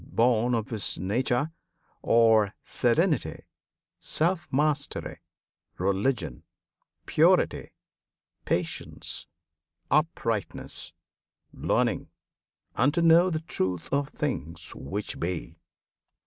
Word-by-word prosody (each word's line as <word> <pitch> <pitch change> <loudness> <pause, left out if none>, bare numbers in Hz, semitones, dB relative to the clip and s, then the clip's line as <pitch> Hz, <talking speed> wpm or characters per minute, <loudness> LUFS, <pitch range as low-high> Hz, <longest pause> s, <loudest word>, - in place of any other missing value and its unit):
Born 120 0 +2
of 110 0 -3
his 110 -4 -3
nature, 120 - 0 0.5
are 110 -3 +4
serenity, - - +1 0.6
Self 170 +2 0
mastery, 145 +1 0 0.6
religion, 95 - 0 0.6
purity, - - +3 0.7
Patience, - - -2 0.6
uprightness, 130 - -1 0.6
learning, - - 0 0.7
and 125 +6 +3
to 170 - +2
know 170 +2 +6
The 160 -3 -2
truth 95 - -3
of 140 0 +1
things 85 - -3
which 100 +10 -4
be. 85 -1 -3
115 Hz, 80 wpm, -27 LUFS, 95-145 Hz, 0.7 s, know